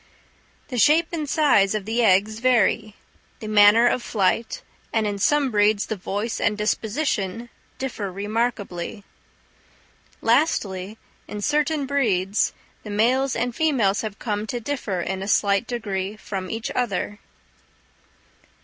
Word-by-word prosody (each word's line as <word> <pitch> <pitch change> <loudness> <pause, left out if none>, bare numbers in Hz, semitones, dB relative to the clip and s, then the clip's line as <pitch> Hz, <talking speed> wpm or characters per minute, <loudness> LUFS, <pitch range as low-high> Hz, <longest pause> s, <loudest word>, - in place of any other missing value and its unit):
The 250 -3 -2
shape 315 +7 +4
and 310 -4 -3
size 215 -11 +3
of 210 -3 -3
the 230 +3 0
eggs 210 +2 +3
vary. 230 -3 +2 0.4
The 215 - -7
manner 210 +2 +6
of 245 +1 +2
flight, 220 +1 -1 0.3
and 220 -1 +1
in 205 -1 -2
some 285 +4 +2
breeds 205 -1 +3
the 220 - -3
voice 205 +4 -3
and 210 -2 +1
disposition, 220 0 -2 0.3
differ 225 -7 -4
remarkably. 205 -1 -3 1.2
Lastly, 220 - 0 0.3
in 210 - -6
certain 300 +3 +1
breeds, 210 -8 +1 0.3
the 210 - -10
males 255 +6 +1
and 240 0 -2
females 245 -11 +2
have 215 -3 -5
come 210 -2 -3
to 245 - -3
differ 225 -8 -3
in 190 +2 -3
a 195 - -4
slight 200 +1 +2
degree 205 -4 -3
from 190 -3 -5
each 225 +4 -4
other. 205 -3 -2
215 Hz, 130 wpm, -23 LUFS, 200-245 Hz, 1.2 s, manner